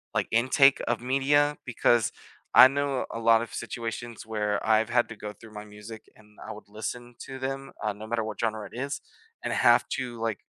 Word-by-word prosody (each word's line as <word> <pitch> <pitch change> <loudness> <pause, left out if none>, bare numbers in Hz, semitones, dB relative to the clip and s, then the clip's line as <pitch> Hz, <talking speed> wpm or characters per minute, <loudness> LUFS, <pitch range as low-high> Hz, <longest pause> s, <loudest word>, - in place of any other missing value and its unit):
like - - +1
intake 130 +4 +4
of 120 -1 0
media, 140 +3 +2
because 120 -2 +2 0.4
I 130 - +11
know 140 -1 -1
a 115 - -4
lot 115 0 +4
of 115 - -10
situations 115 0 -6
where 105 -2 -2
I've 110 0 +3
had 120 0 +2
to 110 - -8
go 105 0 -7
through 110 0 -15
my 105 0 -7
music 105 +1 -11
and 105 -1 -22
I - - -6
would 105 0 -11
listen 110 +4 -6
to 135 - -7
them, 135 +1 -5
uh, 105 - 0
no 105 +2 -10
matter 115 0 -1
what 110 -1 -6
genre 110 -2 -2
it - - -8
is, 140 +3 -4 0.4
and - - -2
have - - +4
to 125 -3 -4
like 115 -3 -2
115 Hz, 205 wpm, -27 LUFS, 110-130 Hz, 0.4 s, I